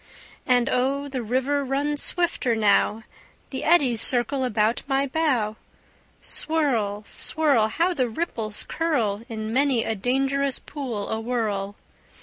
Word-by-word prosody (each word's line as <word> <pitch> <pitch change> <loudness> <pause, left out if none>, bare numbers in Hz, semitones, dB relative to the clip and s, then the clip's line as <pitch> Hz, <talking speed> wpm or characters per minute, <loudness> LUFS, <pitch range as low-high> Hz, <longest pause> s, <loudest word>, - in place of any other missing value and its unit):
And 245 -1 +3
oh, 275 +3 0
the 265 -2 -3
river 260 +5 0
runs 285 +2 0
swifter 335 -9 +1
now; 215 +1 +2 0.5
The 265 - -4
eddies 275 -9 +3
circle 255 +2 +1
about 225 -2 +1
my 270 0 +1
bow. 260 -8 0 0.6
Swirl, 235 -10 -1
swirl! 280 -8 +2
How 340 +11 0
the 255 -7 0
ripples 220 -6 -2
curl 240 -11 0
In 220 -1 -4
many 265 -3 +2
a 225 - -1
dangerous 270 +5 0
pool 250 -9 -5
awhirl! 220 -3 -2
255 Hz, 125 wpm, -24 LUFS, 220-280 Hz, 0.6 s, And